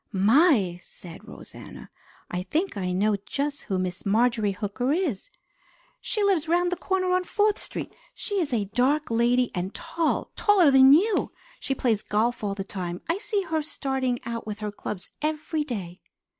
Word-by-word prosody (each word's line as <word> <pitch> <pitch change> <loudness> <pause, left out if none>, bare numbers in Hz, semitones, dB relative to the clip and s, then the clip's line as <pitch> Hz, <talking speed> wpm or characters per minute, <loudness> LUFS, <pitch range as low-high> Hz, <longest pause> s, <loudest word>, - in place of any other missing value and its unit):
"My!" 210 - +3
said 180 +5 -12
Rosanna. - - -11 0.4
"I 180 - -2
think 310 - -2
I 185 -2 -2
know 205 +3 +1
just 285 +4 -3
who 190 - -2
Miss 185 0 -3
Marjorie 220 0 +2
Hooker 210 +7 -2
is. 315 - -1 0.7
She 425 -4 -1
lives 370 -6 +2
round 350 +1 +2
the - - 0
corner 370 +1 -1
on 365 0 +2
Fourth 420 +2 +1
Street. - - -6 0.2
She 405 -2 -2
is 305 - -2
a 220 -4 0
dark 280 +3 +1
lady, 240 +2 +2
and 185 +2 -4
tall; 330 -1 -1
taller 380 -8 +4
than 265 0 +7
you. 400 +8 +3 0.3
She 270 - -2
plays 225 -5 +1
golf 220 +3 0
all 200 -1 -1
the 195 - -4
time. 180 -3 -5
I 335 +4 0
see 415 -2 -1
her 320 -3 -1
starting 265 -4 -2
out 230 -1 -5
with 210 -1 -4
her 210 -1 -4
clubs 205 -2 -7
every 305 0 -1
day." 195 - -6
250 Hz, 170 wpm, -26 LUFS, 205-330 Hz, 0.7 s, than